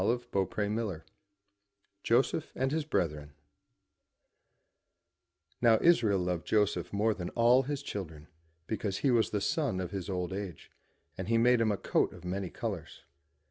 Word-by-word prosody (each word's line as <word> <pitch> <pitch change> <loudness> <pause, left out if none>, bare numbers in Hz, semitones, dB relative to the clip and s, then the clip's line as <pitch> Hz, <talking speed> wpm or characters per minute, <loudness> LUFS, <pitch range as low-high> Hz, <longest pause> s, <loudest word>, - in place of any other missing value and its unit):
293 105 -2 0
MY 105 - -1
BOOK 110 -3 -2
HOUSE - - -16 1.0
JOSEPH 130 +8 +1
AND 130 +1 0
HIS 155 0 -1
BRETHREN 75 - -2 2.3
OW 115 -2 +6
Israel 120 - +4
loved 90 -1 -2
Joseph 95 -5 +1
more 105 +2 +2
than 90 -4 -5
all 120 +2 +5
his 140 +1 -4
children, 80 - -6 0.4
be 110 - -2
cause 100 -3 -2
he 135 - +2
was 115 -2 +3
the 105 - -1
son 140 - 0
of 90 -2 -4
his 95 -2 -5
old 90 -1 -2
age, 95 -4 -6 0.5
and 95 - -4
he 115 +1 +3
made 120 +1 +4
him 110 -2 +3
a 100 - -1
coat - - +1
of 90 -1 -12
many 95 +1 -3
colours. - - -6
105 Hz, 160 wpm, -31 LUFS, 90-120 Hz, 2.3 s, OW